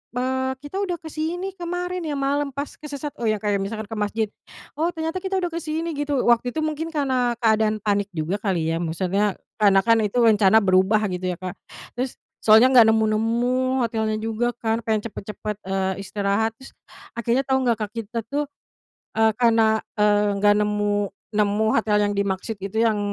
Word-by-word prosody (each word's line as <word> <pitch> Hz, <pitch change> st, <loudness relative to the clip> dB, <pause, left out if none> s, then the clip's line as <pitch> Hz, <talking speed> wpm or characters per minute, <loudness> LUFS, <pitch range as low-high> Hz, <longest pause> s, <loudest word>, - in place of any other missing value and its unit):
eee, 260 Hz, +1 st, 0 dB
kita 380 Hz, +7 st, -5 dB
udah 370 Hz, -3 st, -1 dB
kesini 330 Hz, +4 st, -4 dB
kemarin 355 Hz, +1 st, -3 dB
ya 290 Hz, -, -2 dB
malam 280 Hz, +1 st, 0 dB
pas 285 Hz, +1 st, -5 dB
kesesat. 290 Hz, -1 st, -6 dB
Oh 230 Hz, -, -1 dB
ya 215 Hz, -, +2 dB
kayak 205 Hz, -1 st, +1 dB
misalkan 215 Hz, +2 st, -4 dB
ke 220 Hz, -, -4 dB
masjid, 215 Hz, +1 st, 0 dB, 0.5 s
"Oh 330 Hz, -, +2 dB
ternyata 325 Hz, +3 st, -2 dB
kita 385 Hz, +1 st, -3 dB
udah 355 Hz, -2 st, -1 dB
ke 335 Hz, -, -3 dB
sini" 325 Hz, +1 st, -3 dB
gitu, 290 Hz, -2 st, -1 dB
waktu 240 Hz, +2 st, +2 dB
itu 315 Hz, -, 0 dB
mungkin 310 Hz, +1 st, -2 dB
karena 260 Hz, -6 st, 0 dB
keadaan 215 Hz, -1 st, +2 dB
panik 205 Hz, -1 st, +1 dB
juga 170 Hz, +6 st, -2 dB
kali 175 Hz, -6 st, 0 dB
ya 165 Hz, -, -1 dB
maksudnya 185 Hz, +4 st, 0 dB, 0.2 s
karena 200 Hz, -2 st, +5 dB
kan 230 Hz, -1 st, +4 dB
itu 210 Hz, +2 st, -1 dB
rencana 215 Hz, -2 st, +5 dB
berubah 190 Hz, +3 st, +3 dB
gitu 180 Hz, 0 st, -2 dB
ya, -, -, -20 dB
Kak. 185 Hz, -1 st, -6 dB, 0.4 s
Terus, 250 Hz, +1 st, -4 dB, 0.2 s
soalnya 225 Hz, +5 st, +6 dB
enggak 235 Hz, -3 st, +8 dB
nemu-nemu 235 Hz, +4 st, +1 dB
hotelnya 220 Hz, -1 st, -1 dB
juga 225 Hz, +2 st, -1 dB
kan, 225 Hz, 0 st, -1 dB
pengen 220 Hz, -2 st, -1 dB
cepet-cepet 210 Hz, +1 st, -6 dB
eee, 190 Hz, 0 st, 0 dB
istirahat, 200 Hz, +3 st, -1 dB
terus 265 Hz, -, -13 dB, 0.4 s
akhirnya 235 Hz, +3 st, 0 dB
tau 265 Hz, 0 st, +2 dB
enggak 235 Hz, -4 st, +1 dB
Kak, 210 Hz, -, -15 dB
kita 230 Hz, 0 st, -4 dB
tuh 290 Hz, +1 st, -1 dB, 0.7 s
eee, 220 Hz, 0 st, +4 dB
karena 225 Hz, -2 st, +4 dB, 0.2 s
eee, 205 Hz, -1 st, +3 dB
enggak 205 Hz, +1 st, +4 dB
nemu 210 Hz, 0 st, +1 dB, 0.4 s
nemu 210 Hz, 0 st, +1 dB
hotel 215 Hz, -2 st, +2 dB
yang 205 Hz, -, +1 dB
dimaksud 200 Hz, +1 st, -2 dB
gitu 195 Hz, +2 st, -6 dB
yang 220 Hz, -2 st, +2 dB
220 Hz, 180 wpm, -23 LUFS, 205-265 Hz, 0.7 s, enggak